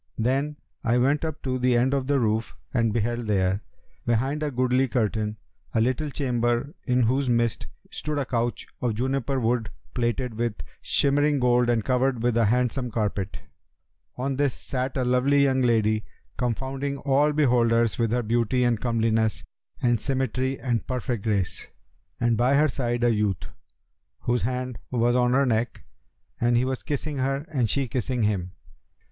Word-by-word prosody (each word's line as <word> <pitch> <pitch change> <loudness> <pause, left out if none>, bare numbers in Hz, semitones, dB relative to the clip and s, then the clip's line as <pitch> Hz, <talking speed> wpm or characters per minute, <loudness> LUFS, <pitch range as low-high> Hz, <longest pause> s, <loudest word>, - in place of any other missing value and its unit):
Then 135 +6 0 0.3
I 120 +1 +2
went 140 +5 +2
up 160 -2 -4
to 130 -1 -1
the 125 -1 +3
end 130 +3 +2
of 135 -2 0
the 140 -1 +2
roof 110 -1 0 0.2
and 115 -3 +2
beheld 120 +1 -1
there, 95 -1 +1 0.4
behind 130 +6 0
a 150 - 0
goodly 130 0 +2
curtain, 110 -3 -1 0.4
a - - +4
little 130 +6 +1
chamber 125 -1 0
in 125 -1 +2
whose 130 +3 +1
midst 120 -1 +1 0.2
stood 150 -1 -3
a 140 - 0
couch 120 -1 -1 0.2
of 120 -3 0
juniper 130 +2 -1
wood[FN#285] 115 -1 0 0.3
plated 120 0 -1
with 115 -1 -1 0.3
shimmering 145 +1 +2
gold 125 -1 +3
and 115 -3 +1
covered 130 -2 +1
with 120 -1 +2
a 115 -1 +4
handsome 125 +2 +1
carpet. 105 -3 -2 0.8
On 135 +1 -2
this 140 -3 +1
sat 130 +1 -3
a 130 - +1
lovely 130 +3 +3
young 130 -1 +2
lady, 110 -3 +2 0.3
confounding 135 +3 -2
all 140 +2 +2
beholders 120 -6 +2
with 115 -1 +2
her 120 0 +1
beauty 120 +3 +1
and 120 -3 +1
comeliness 115 -2 +1 0.4
and 120 -2 +3
symmetry 130 +1 -1
and 120 -4 -1
perfect 125 -4 -2
grace, 100 -5 -1 0.5
and 120 -1 +2
by 125 +5 +3
her 150 +2 +5
side 120 -2 -1
a 120 -1 +4
youth, 105 -4 0 0.8
whose 120 0 0
hand 125 +1 -3
was 120 0 +2
on 125 0 +3
her 140 +1 +4
neck; 115 -1 -1 0.6
and 120 0 +3
he 125 - +2
was 130 -1 -2
kissing 145 -1 -3
her 135 +2 -1
and 125 -7 +1
she 140 -2 0
kissing 125 0 -1
him. 95 -4 -1
125 Hz, 165 wpm, -25 LUFS, 115-135 Hz, 0.8 s, her